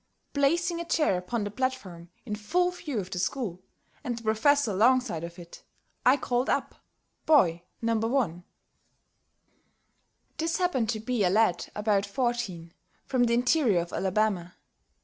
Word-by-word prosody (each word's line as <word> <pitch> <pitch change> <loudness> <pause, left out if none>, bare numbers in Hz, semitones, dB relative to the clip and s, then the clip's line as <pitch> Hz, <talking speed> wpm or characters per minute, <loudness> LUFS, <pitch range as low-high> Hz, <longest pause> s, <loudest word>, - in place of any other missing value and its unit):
Placing 335 +5 +1
a 340 - -4
chair 305 - +2
upon 185 +5 -2
the 205 - -4
platform, 205 -9 -4 0.2
in 215 - -4
full 355 +13 +1
view 310 -8 -5
of 185 -1 -6
the 180 - -3
school, 190 -4 -2 0.4
and 245 -4 -3
the 230 - -9
Professor 230 +4 +3
alongside 225 -3 +2
of 170 +1 -7
it, 170 -1 -12 0.4
I 255 +3 +5
called 250 -1 -1
up - - 0 0.5
Boy 175 - +4 0.2
No. 230 0 +2
1. 225 -7 0 1.9
This 325 +1 -1
happened 310 - 0
to 225 -2 -1
be 235 -1 -1
a 180 - +3
lad 195 -3 +2
about 205 -1 +1
fourteen, 205 -8 -2 0.3
from 250 -2 +2
the 235 0 +2
interior 245 - +3
of 170 - -8
Alabama. 190 -2 0
225 Hz, 150 wpm, -28 LUFS, 185-265 Hz, 1.9 s, I